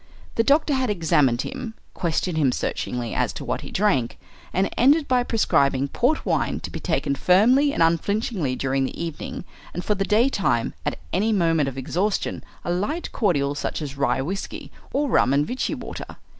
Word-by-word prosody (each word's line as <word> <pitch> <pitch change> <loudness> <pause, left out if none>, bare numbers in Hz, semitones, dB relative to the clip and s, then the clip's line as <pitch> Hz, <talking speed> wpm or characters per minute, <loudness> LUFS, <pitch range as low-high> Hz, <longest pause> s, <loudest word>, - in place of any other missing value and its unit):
The 225 - +2
doctor 290 +3 +3
had 260 -3 +1
examined 150 - +2
him, 220 -1 -6 0.2
questioned 175 0 -1
him 145 -5 +3
searchingly 120 -1 -3
as - - 0
to - - -7
what - - -2
he - - -8
drank, 180 - +1 0.3
and 190 +1 +1
ended 285 +5 +4
by 255 -1 +3
prescribing 140 - +2
port 275 - +1
wine - - 0
to - - -6
be - - -5
taken 140 - 0
firmly 230 - +4
and 170 - +2
unflinchingly 170 - 0
during 135 +1 0
the - - -6
evening, 165 -3 -5 0.3
and 175 - -4
for 210 - +2
the 195 -1 -1
daytime, 210 - +2
at - - -1 0.2
any 210 +5 +2
moment 165 -8 +2
of 135 - -10
exhaustion, 180 +10 -1 0.2
a 175 - -1
light 210 - -2
cordial 145 - +1
such 145 - -3
as 145 -3 -5
rye 140 -1 +1
whiskey, 195 +7 -5 0.2
or 290 +1 +1
rum 135 - +3
and 145 +1 +3
Vichy 255 +8 -2
water. - - -8
180 Hz, 180 wpm, -24 LUFS, 140-225 Hz, 0.3 s, ended